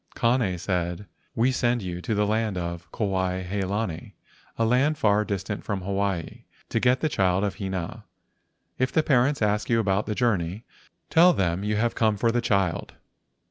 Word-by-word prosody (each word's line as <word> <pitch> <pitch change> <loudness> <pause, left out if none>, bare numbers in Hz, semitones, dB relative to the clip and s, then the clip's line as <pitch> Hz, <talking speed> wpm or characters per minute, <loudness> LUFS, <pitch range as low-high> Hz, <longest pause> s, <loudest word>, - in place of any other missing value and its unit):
Kane 115 -6 +1
said: 90 +1 -2 0.2
" - - -41
We 120 +3 +3
send 120 -3 0
you 90 -1 -5
to 110 - -2
the 105 0 +2
land 110 -1 0
Kuai 90 +2 -2
he 95 +3 -3
lani, 95 -3 -3 0.4
a 115 - +2
land 135 +6 +2
far 105 -2 +3
distant 100 0 -4
from 100 -3 -3
Hawaii, 95 -3 -2 0.2
to 115 - 0
get 125 +2 +2
the 155 - +2
child 95 -7 +1
of 100 -2 -2
Hina. 95 -4 -4 0.7
If 130 0 +1
the 160 - +2
parents 135 -2 +2
ask 105 0 0
you 115 -1 +3
about 100 -1 0
your 105 - -2
journey, 100 -3 0 0.5
tell 175 +2 +6
them 90 - 0
you 105 +1 0
have 115 +2 +1
come 110 -2 +1
for 115 +3 +2
the 120 +1 +1
child. 100 -6 0
105 Hz, 180 wpm, -25 LUFS, 95-115 Hz, 0.7 s, tell